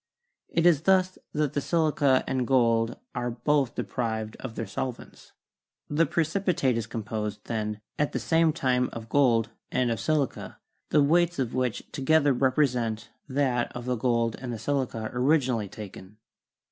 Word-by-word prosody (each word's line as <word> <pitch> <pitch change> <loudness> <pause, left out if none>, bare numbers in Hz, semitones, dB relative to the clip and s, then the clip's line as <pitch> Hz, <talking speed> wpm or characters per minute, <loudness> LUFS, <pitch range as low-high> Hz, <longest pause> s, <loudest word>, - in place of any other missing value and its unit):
It 170 - +1
is 165 -5 +5
thus 185 +1 +2
that 150 -2 0
the 145 - 0
silica 150 -5 +2
and 130 -2 -1
gold 115 -3 +2 0.2
are 125 0 -2
both 135 +1 0
deprived 110 -3 -3
of 120 -4 -7
their 115 - -3
solvents. 120 +5 -6 0.6
The 160 +3 +3
precipitate 165 -5 +1
is 115 -1 -2
composed, 105 -2 -4
then, 105 -2 -3 0.2
at 150 - +1
the - - -2
same 165 -1 +3
time 125 -3 +1
of 115 -1 -8
gold 115 -4 +3 0.2
and 125 -2 +1
of 115 - -2
silica, 150 +3 -1 0.3
the 150 -1 +4
weights 170 +3 +3
of 130 -4 -1
which 125 -2 -1
together 145 +1 +3
represent 125 -4 0 0.2
that 130 -3 0
of 120 0 -6
the 125 0 0
gold 115 -1 +1
and 130 - -8
of 120 - -3
the - - -4
silica 120 -2 -2
originally 125 -5 +1
taken." 100 0 -10
125 Hz, 160 wpm, -27 LUFS, 115-145 Hz, 0.6 s, is